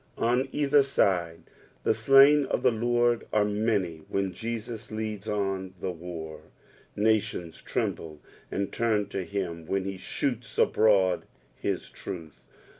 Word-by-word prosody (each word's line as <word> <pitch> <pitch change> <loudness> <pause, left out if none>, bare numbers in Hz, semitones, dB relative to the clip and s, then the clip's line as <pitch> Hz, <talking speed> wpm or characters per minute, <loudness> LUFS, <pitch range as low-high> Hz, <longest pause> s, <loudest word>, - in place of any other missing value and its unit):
On 125 +3 +1
either 145 0 +4
side 90 -11 +1 0.4
the - - +3
slain 140 +1 +6
of - - -1
the - - +5
Lord 120 +1 +1
are 105 -1 +3
many 105 -5 0
when 95 -1 -1
Jesus 115 +2 -5
ileads 110 -1 -5
on 95 -3 -2
the 95 - -2
war. 80 -2 -7 0.5
Nations 105 -6 0
tremble 80 -2 -3 0.3
and 100 0 -2
turn 110 -3 0
to 95 -1 -3
him 85 -4 -4
when 95 -1 0
he 95 0 -4
shoots 125 +3 -3
abroad 100 -4 +3 0.3
his - - -3
truth. 85 -6 -7
105 Hz, 130 wpm, -28 LUFS, 90-115 Hz, 0.5 s, slain